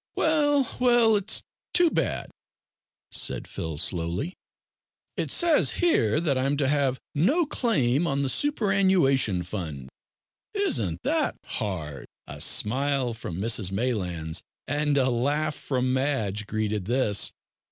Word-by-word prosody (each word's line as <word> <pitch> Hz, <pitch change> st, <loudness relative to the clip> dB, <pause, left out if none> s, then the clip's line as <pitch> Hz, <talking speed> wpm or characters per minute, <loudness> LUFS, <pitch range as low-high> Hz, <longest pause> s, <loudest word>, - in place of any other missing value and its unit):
"Well, 290 Hz, -4 st, +2 dB
well, 240 Hz, -3 st, +4 dB
it's 205 Hz, +1 st, +1 dB, 0.3 s
too 350 Hz, -2 st, +5 dB
bad," -, -, -2 dB, 0.8 s
said -, -, -1 dB
Phil 80 Hz, -2 st, -5 dB
slowly, 85 Hz, -, -1 dB, 0.8 s
"it -, -, -2 dB
says 340 Hz, -3 st, +4 dB
here 115 Hz, -, +2 dB
that 145 Hz, -6 st, 0 dB
I'm 135 Hz, +2 st, 0 dB
to 140 Hz, -2 st, +1 dB
have 140 Hz, -2 st, +1 dB, 0.2 s
`no 285 Hz, -, +2 dB
claim 170 Hz, -, +1 dB
on 140 Hz, -1 st, 0 dB
the -, -, 0 dB
superannuation 190 Hz, -, +2 dB
fund.' 80 Hz, -8 st, -6 dB, 0.7 s
Isn't 115 Hz, -, 0 dB
that -, -, +1 dB
hard?" 80 Hz, -, -4 dB, 0.2 s
A -, -, -8 dB
smile 130 Hz, +2 st, +1 dB
from 100 Hz, -7 st, -7 dB
Mrs 110 Hz, -3 st, +1 dB
Maylands, 90 Hz, -8 st, -2 dB, 0.3 s
and 145 Hz, +1 st, 0 dB
a 130 Hz, -1 st, +3 dB
laugh 145 Hz, +6 st, 0 dB
from 130 Hz, -3 st, -2 dB
Madge, 110 Hz, -7 st, -1 dB
greeted 105 Hz, -2 st, -2 dB
this. 115 Hz, -3 st, +1 dB
130 Hz, 120 wpm, -26 LUFS, -, 0.8 s, too